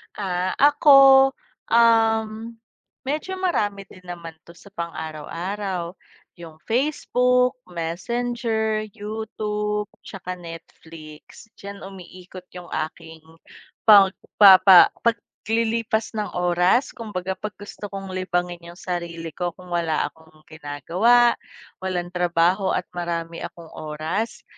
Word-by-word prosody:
Ah, 185 -2 -2
ako, 275 -2 +7 0.4
um, 225 -1 +2 0.5
medyo 305 +7 -3
marami 210 - -1
din 180 0 -16
naman 170 -2 -8
'to 170 - -15
sa 200 +3 -17
pang-araw-araw, 170 +3 -5 0.5
yung 160 -2 -12
Facebook, 250 0 +1
Messenger, 220 +5 -2
YouTube, 210 -1 -4 0.2
'tsaka 185 -1 -7
Netflix, 165 +1 -12
diyan 200 0 -9
umiikot 185 -1 -11
yung 180 -2 -10
aking 160 +1 -5 0.7
pagpapa 195 -2 +7
paglilipas 230 -1 -1
ng 210 -1 -2
oras 180 +7 +2
kumbaga 190 -5 -5
'pag 215 0 -6
gusto 205 0 -9
kong 195 -1 -7
libangin 180 -2 -2
yung 170 - -11
sarili 170 -2 -5
ko 175 -2 -4
kung 180 -1 -14
wala 165 -3 0
akong 160 -1 -22
ginagawa, 180 +11 +2 0.5
walang 180 -2 -3
trabaho, 180 +2 +1
at 180 - -1
marami 170 -1 -4
akong 170 -2 -9
oras, 155 +8 -4
190 Hz, 105 wpm, -23 LUFS, 170-220 Hz, 0.7 s, ako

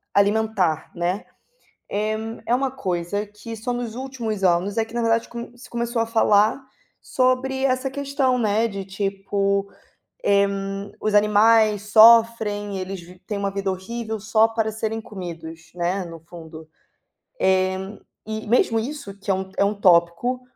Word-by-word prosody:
alimentar, 200 -5 +1
né, 175 +4 -2 0.6
é 215 +1 -1 0.3
é 235 - +1
uma 265 +2 +1
coisa 200 -5 -3
que 210 +2 -9
só 245 +3 -3
nos 240 -2 -4
últimos 240 -6 -4
anos 185 +3 +2
é 225 - +2
que 225 - -16
na 240 - -1
verdade 230 0 +1
com 240 +1 -8
se 245 - -13
começou 235 0 -2
a - - +1
falar 220 +1 +3 0.4
sobre 260 +1 0
essa 260 0 0
questão, 275 -2 0
né, 220 0 +2
de 200 -3 -5
tipo: 195 0 -1 0.6
"Eh, 200 0 +4 0.5
os 215 - 0
animais 210 0 +4
sofrem, 220 -2 +5
eles 185 0 -5
vi 180 +1 -15
têm 210 - -3
uma 200 0 -1
vida 195 0 -2
horrível 220 +4 -5
só 215 +2 +3
para 225 -1 -1
serem 220 +1 -3
comidos", 165 -6 -9
né, 180 +2 -1
no 165 -1 -9
fundo. 160 -2 -11 0.7
Eh, 190 +1 +1 0.3
e 220 0 -5
mesmo 225 0 +3
isso 225 -5 -6
que 200 - -9
é - - +4
um 190 0 -4
é - - +4
um 205 - +1
tópico 180 +8 +3
210 Hz, 155 wpm, -23 LUFS, 190-230 Hz, 0.7 s, sofrem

